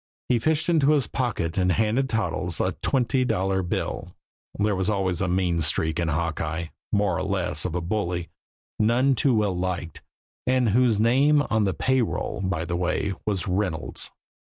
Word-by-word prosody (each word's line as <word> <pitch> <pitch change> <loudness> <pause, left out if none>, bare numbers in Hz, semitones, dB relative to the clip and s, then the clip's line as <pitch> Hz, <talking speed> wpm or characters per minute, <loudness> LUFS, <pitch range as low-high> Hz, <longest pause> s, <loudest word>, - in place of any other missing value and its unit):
He 125 -2 +3
fished 155 +5 +1
into 155 -4 +4
his 145 -4 +2
pocket 100 -9 -2
and 90 -1 +2
handed 115 +6 +1
Toddles 115 -3 -1
a - - +1
twenty 130 0 +1
dollar 95 -4 0
bill 90 - -4 0.4
there 105 0 +1
always 95 +1 0
was 95 -4 0
a 95 - +1
mean 90 -2 +1
streak 80 +1 0
in 85 - 0
Hawkeye, 80 0 -2 0.2
more 100 -4 +2
or - - -2
less 90 -5 0
of 90 -2 -2
a 90 - -1
bully, 85 -2 -2 0.5
none 120 +5 +3
too 130 +1 +2
well 105 -4 +1
liked, 90 -2 -3 0.5
and 130 -2 +3
whose 115 0 +3
name 140 +6 +4
on 110 -2 +3
the 95 -3 -1
pay 130 +8 +2
roll, 110 - -2
by 85 -3 -1
the 85 - -2
way, 90 +3 -1
was 100 -4 -1
Reynolds. 90 -4 -1
100 Hz, 175 wpm, -25 LUFS, 90-120 Hz, 0.5 s, into